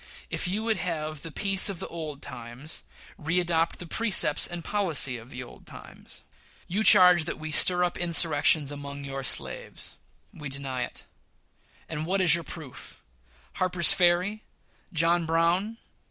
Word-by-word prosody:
If - - -2
you 205 +4 -2
would 225 -2 0
have 155 -4 -5
the 165 - -8
peace 195 +5 +3
of 195 - -6
the - - -7
old 155 -4 -8
times, 120 +6 -8 0.4
readopt 165 0 0
the 175 - -10
precepts 185 -5 +2
and 175 -1 -8
policy 170 -10 +1
of 115 +2 -15
the 125 -1 -8
old 120 - -16
times. - - -13 0.4
You 200 +5 -2
charge 180 -6 +7
that - - -4
we 155 0 -7
stir 180 +3 +5
up 175 - -3
insurrections 160 -4 +2
among 140 0 -8
your 135 0 -6
slaves. 130 - -4 0.4
We 150 -3 -8
deny 135 -2 -5
it; - - -13 0.8
and 155 0 -6
what 195 +2 0
is 180 -4 +4
your 170 -1 0
proof'? 155 -7 -11 0.6
Harper's 180 -2 +7
Ferry! 180 +4 +1 0.5
John 165 0 0
Brown!! 170 +7 0
165 Hz, 155 wpm, -26 LUFS, 150-180 Hz, 0.8 s, charge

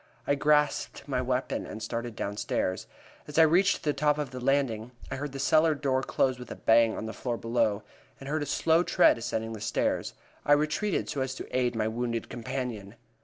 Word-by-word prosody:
I - - +2
grasped 150 0 +1
my 130 -3 0
weapon 130 +1 -2
and 110 +1 -7
started 115 +1 -4
downstairs. 100 -2 -2 0.4
As 150 - -7
I 165 - +8
reached 180 +5 +3
the 150 - +1
top 150 +1 +2
of 145 -4 -3
the 130 - -6
landing, 125 -3 0 0.2
I 135 - -2
heard 145 +1 -4
the 135 - -7
cellar 155 +3 +3
door 135 -2 0
close 130 -1 0
with 125 - -9
a - - -6
bang 115 0 +3
on - - -4
the 110 - -5
floor 120 +2 -3
below, 115 -3 0 0.4
and 135 - -9
heard 155 +2 -1
a 145 - -3
slow 165 +1 +3
tread 145 - +4
ascending 115 -1 -3
the 110 - -8
stairs. 60 - -1 0.3
I 145 - +4
retreated, 155 +7 0
so 140 - -3
as 130 0 -2
to - - -7
aid 125 -2 +1
my 110 -1 0
wounded 115 0 -3
companion. 115 -4 -5
130 Hz, 205 wpm, -28 LUFS, 115-145 Hz, 0.4 s, I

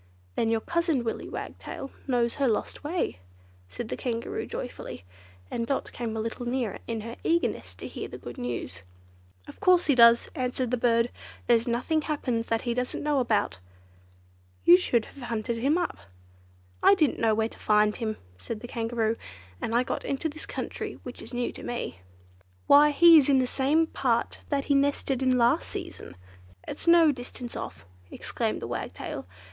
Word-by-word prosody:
"Then 225 - +1
your 225 -1 +1
cousin, 335 -5 0
Willy 225 - -3
Wagtail, 275 - -7 0.2
knows 240 -3 +2
her 275 - +4
lost 225 +4 -1
way," 310 - -2 0.5
said 225 - -6
the - - -2
Kangaroo 235 -2 -3
joyfully, 85 - -6 0.5
and 230 0 -2
Dot 275 - -1
came 225 -2 -4
a - - -1
little 230 +2 -4
nearer 245 -4 -1
in 225 -2 -2
her 230 +2 -7
eagerness 340 +1 0
to - - -7
hear - - -6
the - - -8
good - - -9
news. 85 - -4 0.7
"Of - - -12
course 365 -1 +5
he 290 - +4
does," 235 -1 +7
answered 250 -1 -1
the - - +3
bird; 230 0 +2 0.3
"there's 235 -1 +3
nothing 250 +7 +1
happens 255 -7 -2
that 225 0 0
he 240 -2 0
doesn't 250 +3 -2
know. 290 -3 +2 1.4
You 175 - +10
should 220 +5 +2
have 280 - -13
hunted 235 -1 -2
him 275 +8 +2
up." 350 - -2 0.8
"I 200 - +7
didn't 300 +3 +2
know 220 -1 +3
where 220 +1 +1
to - - -16
find 210 0 +3
him," 220 -2 -3 0.2
said 225 -2 -5
the 240 - -7
Kangaroo, 230 -1 -1 0.4
"and 230 - -1
I 245 - +4
got - - -3
into 275 +4 -1
this 310 +1 -7
country, - - -4
which - - -8
is - - -10
new 245 -1 -1
to - - -10
me." 240 - -4 0.7
"Why 290 +1 +7
he 330 +2 +8
is 285 - +1
in 275 - +5
the 260 - +3
same 285 +6 +2
part 250 -7 0
that 280 -2 0
he 285 - +2
nested 275 -1 +1
in 255 -1 +3
last 235 0 +3
season. 90 - -7 0.5
It's - - -6
no 335 -2 +7
distance 245 -2 -7
off," 85 - -7 0.2
exclaimed - - -3
the - - -3
Wagtail. - - -5
245 Hz, 180 wpm, -27 LUFS, 230-280 Hz, 1.4 s, You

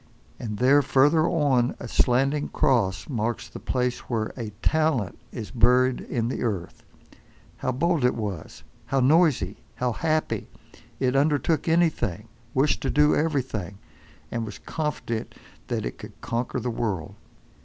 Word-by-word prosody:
And 105 -3 -4
there, 135 +5 +5
further 145 +4 +4
on, 135 -6 +2
a 120 - -6
slanting 135 +5 +2
cross 100 -8 +1
marks 115 -3 -2
the - - -9
place 125 -1 -1
where 110 -3 -1
a 115 -4 -5
Talent 155 - +1 0.2
is 110 -5 -6
buried 125 +2 +3
in 115 -2 -2
the 125 - -3
earth. 95 -7 -3 0.8
How 130 - -1
bold 160 +3 +1
it 125 - +3
was, 100 -8 -5 0.2
how 135 - +1
noisy, 135 - +3 0.2
how 125 -1 0
happy! 155 +5 -1 0.5
It 130 0 +1
undertook 150 +3 +2
anything, 155 - +1 0.3
wished 135 +3 +2
to - - -1
do 150 0 +4
everything, 125 - -1 0.5
and 115 -1 -2
was 110 - -6
confident 150 -7 -4 0.3
that - - -2
it - - -5
could - - -11
conquer 120 +2 -2
the 125 - -2
world. 100 -6 -2
125 Hz, 145 wpm, -25 LUFS, 115-145 Hz, 0.8 s, there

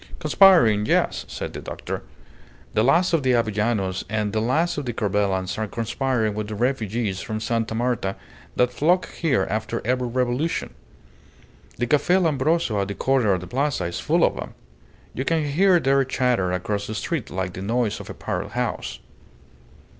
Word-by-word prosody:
"Conspiring. 155 - +5
Yes!" - - +1
said - - -6
the - - -6
doctor. - - -5 0.7
"The 110 - +3
last 170 +8 +3
of 165 - +3
the 130 -1 +2
Avellanos 105 -4 0
and 105 -1 -1
the 110 - +1
last 150 +8 +1
of 145 - -5
the 120 - -2
Corbelans 100 -3 -1
are 110 - -1
conspiring 115 0 -1
with 105 0 -4
the 110 - -5
refugees 110 -4 -1
from 110 +2 -4
Sta. 115 0 -1
Marta 120 -5 -1 0.4
that 125 0 +2
flock 175 +7 +2
here 135 - +1
after 110 +2 -2
every 125 +1 0
revolution. 125 - -1 1.0
The 120 - 0
Cafe 150 +8 +3
Lambroso 155 - +1
at 100 - -2
the 100 - -5
corner 125 -2 +2
of 90 - -1
the 90 - -8
Plaza 140 +7 -1
is 85 - -3
full - - +2
of - - +2
them; - - -7 0.6
you 130 - -3
can 160 +1 +1
hear 175 +5 +4
their 135 -2 +3
chatter 125 -8 0
across 100 +3 -2
the 110 - -5
street 150 +3 -3
like 95 -1 -3
the 95 - -7
noise 115 +2 0
of - - -9
a - - -7
parrot - - -4
house. - - -3
120 Hz, 175 wpm, -23 LUFS, 105-135 Hz, 1.0 s, Conspiring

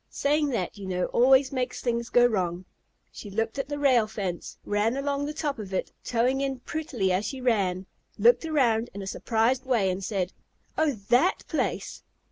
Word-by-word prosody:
Saying 295 +1 +1
that, 210 -5 -3
you 195 - -6
know, 180 -1 0
always 265 +2 +5
makes 255 -2 -2
things 235 -1 -2
go 245 0 +5
wrong. 185 -5 -1 0.5
She 205 - -9
looked 225 +5 -2
at 275 - -3
the 290 - -3
rail 255 -6 +4
fence, 195 -5 -5
ran 210 +5 +1
along 280 0 -1
the - - -3
top 295 -4 -3
of 195 -3 -5
it, - - -2
toeing 250 +3 +1
in 270 -2 -2
prettily 255 - -2
as 185 +3 +1
she 270 - -5
ran, 195 -7 +1 0.3
looked 235 +6 +5
around 245 -8 +1
in 200 - -5
a - - -6
surprised 230 +5 0
way, 230 -8 +2
and 185 +2 -4
said, 190 -3 -2 0.4
"Oh, 315 -2 +2 0.2
that 320 +11 +3
place?" - - -2
235 Hz, 185 wpm, -27 LUFS, 200-275 Hz, 0.5 s, always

